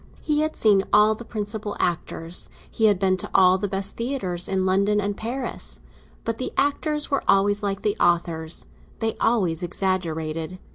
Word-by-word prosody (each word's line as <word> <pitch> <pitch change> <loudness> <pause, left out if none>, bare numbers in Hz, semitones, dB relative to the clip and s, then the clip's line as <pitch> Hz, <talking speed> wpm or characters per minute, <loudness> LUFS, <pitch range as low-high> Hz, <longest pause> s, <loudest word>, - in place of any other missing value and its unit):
He 300 -1 0
had 310 +1 0
seen 205 -3 +4
all 210 +1 +6
the 220 - -8
principal 210 -1 -4
actors—he 170 +5 -2
had 205 -3 +5
been 190 0 +2
to - - -4
all 185 0 +6
the 205 - -1
best 195 0 -1
theatres 215 -9 -1
in 190 -1 0
London 200 +2 +2
and 205 0 -1
Paris. 240 +6 -4 0.4
But 225 0 -3
the 255 - -2
actors 295 +1 +1
were 275 - +2
always 205 +1 +3
like 200 -1 -2
the 210 -1 +1
authors—they 170 +5 -1
always 190 -9 +2
exaggerated. 170 -2 -2
200 Hz, 155 wpm, -24 LUFS, 180-220 Hz, 0.4 s, all